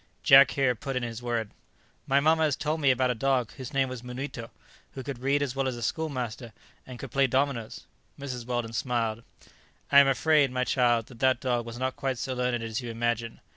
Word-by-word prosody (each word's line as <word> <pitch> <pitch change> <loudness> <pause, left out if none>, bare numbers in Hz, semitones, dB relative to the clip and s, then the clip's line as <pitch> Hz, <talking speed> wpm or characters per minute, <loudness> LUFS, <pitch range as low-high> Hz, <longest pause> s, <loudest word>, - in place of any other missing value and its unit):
Jack 135 +1 +8
here 135 -2 +3
put 135 +3 -6
in 125 - -1
his 115 0 -5
word. 115 -3 -2 0.6
"My 135 +1 +4
mamma 160 +3 +3
has 150 -3 +1
told 155 +1 -2
me 140 - +4
about 130 0 +2
a - - +1
dog 125 0 0
whose 130 -1 -8
name 135 -2 +1
was 130 -2 -7
Munito, 125 -1 -6 0.4
who 130 - -7
could 140 -3 -6
read 140 +3 +1
as 135 -2 -4
well 135 -1 0
as 125 -2 -3
a 120 - -6
schoolmaster, 125 -5 -3 0.3
and 130 -1 -8
could 135 -1 -8
play 135 -1 +3
dominoes." 130 -3 -1 0.3
Mrs. 125 -4 -6
Weldon 120 -2 -2
smiled. 115 -2 -1 0.7
"I 140 - +9
am 140 - +6
afraid, 145 +1 +3
my 125 0 -1
child, 120 -3 +2
that 120 -1 -15
that 130 -1 +3
dog 120 -3 -1
was 115 0 -7
not 130 +1 -2
quite 135 -2 -2
so 130 +2 -3
learned 125 -2 -1
as 115 +1 -3
you 120 - -6
imagine. 115 0 -2
125 Hz, 215 wpm, -27 LUFS, 120-135 Hz, 0.7 s, I